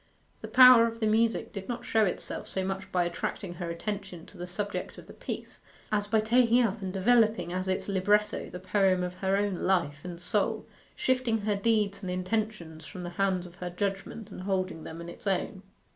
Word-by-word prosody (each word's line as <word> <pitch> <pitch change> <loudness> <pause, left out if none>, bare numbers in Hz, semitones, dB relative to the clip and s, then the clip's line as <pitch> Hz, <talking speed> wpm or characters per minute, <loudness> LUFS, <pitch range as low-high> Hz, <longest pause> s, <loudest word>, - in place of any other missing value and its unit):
The - - -6
power 250 -2 +8
of 230 0 -6
the 220 - 0
music 225 +1 +1
did 195 0 -7
not 240 0 -4
show 220 -1 +3
itself 180 - -3
so 190 -1 -2
much 195 0 -4
by 180 -1 +2
attracting 175 +2 -4
her 175 -1 -5
attention 190 0 -5
to - - -17
the 175 - -5
subject 200 +3 -4
of - - -11
the - - -12
piece, - - -7 0.3
as 205 -1 +1
by 220 +1 +3
taking 240 +2 +4
up 215 -1 -1
and 190 -1 -3
developing 215 -1 +3
as 185 +1 -2
its 190 0 -1
libretto 205 +2 +1
the - - -7
poem 190 -1 +2
of 180 0 -3
her 190 +1 +1
own 200 -2 0
life 170 -7 +1
and 175 -2 -7
soul, 200 +3 0 0.3
shifting 255 -4 +1
her 205 0 0
deeds 200 -1 +1
and 185 - -5
intentions 185 -3 -3
from 185 -3 -8
the 175 - -5
hands 185 -2 +1
of 175 0 -13
her 180 -1 -4
judgment 195 +3 -4
and - - -8
holding 185 -4 -2
them 165 +1 -7
in 170 - -8
its 175 - -9
own. 190 0 -1
195 Hz, 205 wpm, -29 LUFS, 180-215 Hz, 0.3 s, power